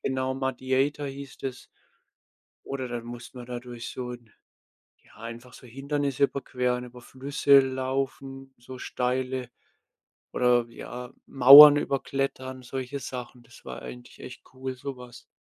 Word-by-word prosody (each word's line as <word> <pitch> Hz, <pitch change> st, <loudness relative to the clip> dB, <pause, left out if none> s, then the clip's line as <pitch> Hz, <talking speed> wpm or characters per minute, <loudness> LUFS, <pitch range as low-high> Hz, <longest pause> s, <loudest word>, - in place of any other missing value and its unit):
genau, 130 Hz, 0 st, -1 dB
Mudiator 135 Hz, +2 st, -1 dB
hieß 135 Hz, 0 st, -9 dB
das. 130 Hz, -2 st, -6 dB, 1.0 s
Oder 130 Hz, -2 st, -4 dB
dann 120 Hz, -1 st, -5 dB
musste 120 Hz, +2 st, -10 dB
man 120 Hz, -, -9 dB
da 120 Hz, -1 st, -5 dB
durch 120 Hz, -1 st, -8 dB
so 125 Hz, -1 st, -6 dB
ja, 120 Hz, -3 st, -20 dB, 0.6 s
einfach 115 Hz, +2 st, -9 dB
so 125 Hz, -, -14 dB
Hindernisse 140 Hz, +2 st, -2 dB
überqueren, 125 Hz, -2 st, -3 dB
über 125 Hz, 0 st, -13 dB
Flüsse 140 Hz, +2 st, +3 dB
laufen, 135 Hz, 0 st, -3 dB
so 125 Hz, +2 st, -11 dB
steile 125 Hz, 0 st, -2 dB, 0.8 s
oder, 125 Hz, -1 st, +3 dB
ja, 125 Hz, +2 st, -9 dB
Mauern 140 Hz, +3 st, +10 dB
überklettern, 135 Hz, -2 st, -3 dB
solche 130 Hz, +2 st, -5 dB
Sachen, 125 Hz, 0 st, -8 dB
das 120 Hz, 0 st, -18 dB
war 65 Hz, -, -8 dB
eigentlich 60 Hz, 0 st, -11 dB
echt -, -, -11 dB
cool, 130 Hz, 0 st, -6 dB
so 135 Hz, 0 st, -7 dB
was. 125 Hz, -1 st, -13 dB
130 Hz, 130 wpm, -26 LUFS, 125-135 Hz, 1.0 s, Mauern